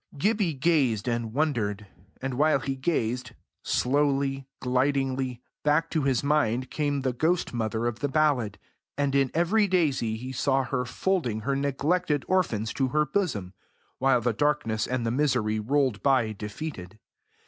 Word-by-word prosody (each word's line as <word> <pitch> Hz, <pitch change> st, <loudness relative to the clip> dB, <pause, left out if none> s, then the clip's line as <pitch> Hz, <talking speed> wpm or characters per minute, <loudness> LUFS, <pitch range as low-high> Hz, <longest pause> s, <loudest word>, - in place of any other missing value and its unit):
Gibbie 200 Hz, -1 st, +1 dB
gazed 135 Hz, -7 st, +1 dB
and 115 Hz, -2 st, -1 dB
wondered; 110 Hz, -8 st, -1 dB, 0.4 s
and 135 Hz, -1 st, -2 dB
while 150 Hz, +4 st, +3 dB
he 135 Hz, +2 st, -3 dB
gazed 125 Hz, -4 st, -1 dB, 0.3 s
slowly, 135 Hz, 0 st, +1 dB
glidingly, 130 Hz, -1 st, 0 dB, 0.2 s
back 150 Hz, +3 st, +2 dB
to 160 Hz, -, +1 dB
his 135 Hz, -3 st, +1 dB
mind 130 Hz, -4 st, +1 dB
came 145 Hz, -2 st, -1 dB
the 130 Hz, -1 st, -1 dB
ghost 165 Hz, +7 st, 0 dB
mother 115 Hz, 0 st, -1 dB
of 120 Hz, -1 st, -2 dB
the 145 Hz, -, 0 dB
ballad, 135 Hz, -8 st, +1 dB, 0.4 s
and 140 Hz, -1 st, 0 dB
in 135 Hz, -1 st, +3 dB
every 200 Hz, +6 st, +3 dB
daisy 140 Hz, -, +1 dB
he 130 Hz, +3 st, -6 dB
saw 135 Hz, +1 st, +1 dB
her 125 Hz, -1 st, -2 dB
folding 125 Hz, -, -1 dB
her 135 Hz, +5 st, -1 dB
neglected 145 Hz, +3 st, 0 dB
orphans 120 Hz, -, 0 dB
to 135 Hz, -, +1 dB
her 150 Hz, +3 st, +1 dB
bosom, 120 Hz, -, -2 dB, 0.5 s
while 130 Hz, -2 st, +3 dB
the 120 Hz, 0 st, +1 dB
darkness 115 Hz, -5 st, 0 dB
and 125 Hz, -2 st, -1 dB
the 115 Hz, -, 0 dB
misery 125 Hz, -6 st, +1 dB
rolled 130 Hz, -2 st, +1 dB
by 130 Hz, -4 st, +3 dB
defeated. 105 Hz, -, -7 dB
135 Hz, 150 wpm, -27 LUFS, 120-150 Hz, 0.5 s, while